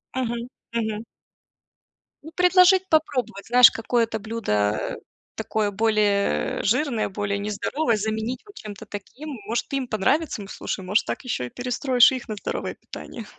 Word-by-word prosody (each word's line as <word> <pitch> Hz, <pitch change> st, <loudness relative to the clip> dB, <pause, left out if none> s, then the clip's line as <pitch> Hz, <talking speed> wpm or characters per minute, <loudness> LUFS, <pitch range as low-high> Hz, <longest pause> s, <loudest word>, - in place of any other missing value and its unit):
Мгм. 240 Hz, -1 st, -2 dB, 0.3 s
Мгм. 220 Hz, -1 st, -2 dB, 1.2 s
Ну, 320 Hz, -, -10 dB
предложить 365 Hz, +1 st, +5 dB
попробовать, 260 Hz, -10 st, 0 dB
знаешь, 245 Hz, 0 st, +8 dB
какое-то 225 Hz, -1 st, 0 dB
блюдо, 105 Hz, -, 0 dB
э, -, -, -4 dB, 0.4 s
такое 215 Hz, -1 st, -1 dB
более, 210 Hz, -1 st, +1 dB
э, -, -, -3 dB
жирное, 240 Hz, 0 st, +1 dB
более 200 Hz, 0 st, -2 dB
нездоровое, 220 Hz, +5 st, -1 dB
заменить 220 Hz, +3 st, -3 dB
вот 410 Hz, -, -16 dB
чем-то 205 Hz, -2 st, -9 dB
таким. 255 Hz, +9 st, -8 dB, 0.2 s
Может, 235 Hz, +4 st, -2 dB
им 265 Hz, -2 st, -1 dB
понравится, 250 Hz, +4 st, 0 dB
м, -, -, -10 dB
слушай, 190 Hz, -, -5 dB
может, 205 Hz, +4 st, +2 dB
так -, -, -4 dB
ещё 220 Hz, -, -2 dB
и -, -, -7 dB
перестроишь 250 Hz, -, +3 dB
их 255 Hz, -2 st, -5 dB
на 215 Hz, -, -3 dB
здоровое -, -, -4 dB
питание. 230 Hz, -3 st, -9 dB
225 Hz, 150 wpm, -24 LUFS, 210-255 Hz, 1.2 s, знаешь